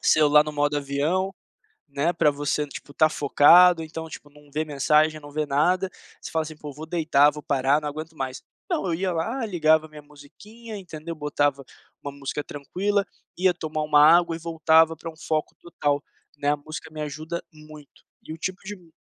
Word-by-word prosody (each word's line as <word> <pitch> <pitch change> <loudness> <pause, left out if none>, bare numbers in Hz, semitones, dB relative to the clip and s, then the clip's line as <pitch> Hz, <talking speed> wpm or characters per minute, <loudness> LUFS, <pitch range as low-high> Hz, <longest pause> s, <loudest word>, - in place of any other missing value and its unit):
celular 150 -1 +5
no 150 - -5
modo 145 0 0
avião, 150 +8 -1 0.5
né, 140 +5 0
pra 155 -3 +3
você, 145 +1 -2
tipo, 145 0 -10
estar 155 +2 +4
focado 165 +4 +6
então, 160 +1 -7
tipo, 145 -2 -11
não 150 0 -20
vê 155 +2 -1
mensagem, 155 +2 +2
não 145 - -12
vê 155 +1 -1
nada, 180 +7 +1 0.3
você - - -8
fala 160 -1 0
assim 155 0 -8
"Poxa, 150 -1 -9
vou 155 +3 -9
deitar, 155 -4 +3
vou 150 0 -9
parar 140 +1 +1
não 150 - -4
aguento 155 +2 -7
mais". 130 -1 -5 0.3
Não 325 - -1
eu 170 - 0
ia 185 +2 -1
lá, 230 +10 -2
ligava 160 -4 +2
a - - -18
minha 150 -1 -12
musiquinha, 205 +11 -12
entendeu, 170 -3 -8
botava 145 -2 -1 0.4
uma 140 - -6
música 140 +1 -5
tranquila, 195 +8 -2 0.3
ia 185 +1 +3
tomar 155 -2 -4
uma 150 -1 +4
água 170 +1 +5
e - - -8
voltava 160 0 +3
pra 165 +1 -7
um 160 - -18
foco 155 -1 -2
total, 145 -4 -2 0.3
né, 145 0 -2
a 150 - +2
música 155 +2 -9
me 155 0 -8
ajuda 155 +3 -5
muito. 155 -2 -15 0.2
E 155 - -9
o 160 - -8
tipo 185 +2 -4
de 205 +1 -6
mu 170 -3 -22
155 Hz, 200 wpm, -24 LUFS, 145-170 Hz, 0.5 s, focado